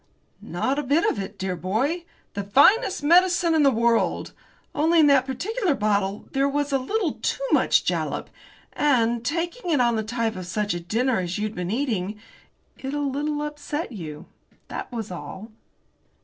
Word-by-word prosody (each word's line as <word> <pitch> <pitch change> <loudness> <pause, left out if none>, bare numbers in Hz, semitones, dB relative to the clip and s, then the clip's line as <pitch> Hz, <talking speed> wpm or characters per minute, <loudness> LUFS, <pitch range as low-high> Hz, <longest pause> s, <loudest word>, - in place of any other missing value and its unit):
"Not 260 - -1
a - - +1
bit 290 +5 +2
of - - 0
it, 195 +1 -6
dear 190 -1 -2
boy! 255 - -1 0.3
The 200 - -3
finest 305 - +4
medicine 350 +1 +4
in 315 - +4
the 280 - +6
world! 235 -1 +1 0.4
Only 325 +3 +3
in 310 - +7
that 275 -2 +4
particular 370 - -1
bottle 205 -2 0
there 275 +1 +1
was 290 0 -1
a 270 - +3
little 370 +5 -2
too - - -1
much - - +3
jalap, - - -2 0.4
and, 240 -5 +2
taking 345 - -2
it 305 -5 +3
on 235 -2 +3
the - - 0
top 225 0 -2
of 185 -1 -6
such 210 0 -1
a 175 - -3
dinner 225 +7 0
as 180 -1 -3
you'd 210 0 -2
been 180 -2 -4
eating, 215 -4 -2 0.6
it 270 +2 -4
a - - -1
little 290 +1 -1
upset 295 +1 -4
you 160 -9 -7 0.4
that - - -6
was 225 -5 -5
all." 190 +4 -8
260 Hz, 175 wpm, -24 LUFS, 210-295 Hz, 0.6 s, in